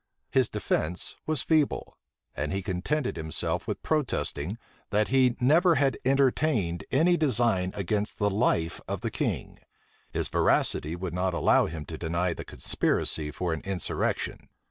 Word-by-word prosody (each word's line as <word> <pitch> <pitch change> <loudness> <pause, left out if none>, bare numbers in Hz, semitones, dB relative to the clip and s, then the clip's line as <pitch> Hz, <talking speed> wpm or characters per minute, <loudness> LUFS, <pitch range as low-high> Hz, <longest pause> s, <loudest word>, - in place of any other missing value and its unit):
His 130 -3 +3
defence 85 +3 -1
was 155 -4 +1
feeble: 155 -3 +1 0.4
and - - -2
he 95 0 -2
contented 110 +11 -1
himself 80 -1 -2
with - - -4
protesting, 115 - -1 0.3
that 105 0 +1
he 130 -1 +4
never 165 +7 +5
had 135 -2 +2
entertained 130 - +2
any 170 +6 +4
design 120 - +2
against 105 +2 -1
the 105 -1 +1
life 95 -6 +1
of - - -3
the - - -2
king: - - -3 0.5
his - - 0
veracity 80 +3 +1
would 90 -1 -5
not 90 0 0
allow - - +4
him 80 -1 -6
to 80 - -7
deny 85 +1 0
the - - -7
conspiracy 75 -1 -1
for 85 +3 -2
an 80 - -4
insurrection. 95 -2 -2
100 Hz, 145 wpm, -28 LUFS, 85-135 Hz, 0.5 s, never